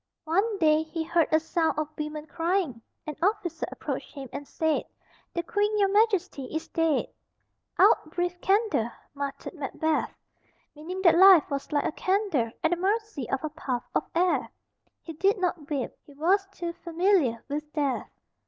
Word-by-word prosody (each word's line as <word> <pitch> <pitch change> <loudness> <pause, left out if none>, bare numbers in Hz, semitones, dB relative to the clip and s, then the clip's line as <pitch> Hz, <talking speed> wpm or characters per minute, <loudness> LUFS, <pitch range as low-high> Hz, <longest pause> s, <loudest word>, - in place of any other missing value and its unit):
One 395 +7 +1
day 310 -3 +4
he 320 +1 -4
heard 335 0 +2
a 315 - +5
sound 320 0 0
of 305 -1 -1
women 300 0 -5
crying. 330 -7 -1 0.2
An 305 -1 -5
officer 360 -4 0
approached - - -5
him 270 -3 -7
and 285 0 -6
said, 320 -1 0 0.5
"The 340 - -1
Queen, 415 +4 0
your 400 -1 +3
Majesty, 390 - +2
is 315 +5 -4
dead." 325 -2 +1 0.7
"Out, 310 - +5
brief 355 +1 -2
candle," 395 - +2 0.2
muttered 280 -1 -5
Macbeth, 315 0 -1 0.6
meaning 360 +5 -6
that 340 -2 +6
life 380 -5 +8
was 280 +1 -3
like 290 -1 +1
a - - 0
candle, 370 - 0
at 320 - +3
the 350 - +2
mercy 400 - -1
of 270 +2 -1
a 310 - -1
puff 260 -5 -3
of - - +1
air. 355 +1 +2 0.5
He 330 - -7
did 390 +7 +2
not 350 -5 -2
weep; 280 -5 -2 0.2
he 285 - -15
was 380 +7 +2
too 345 -3 -5
familiar 340 - +1
with 300 +1 -4
death. 285 -4 -1
325 Hz, 165 wpm, -27 LUFS, 300-375 Hz, 0.7 s, life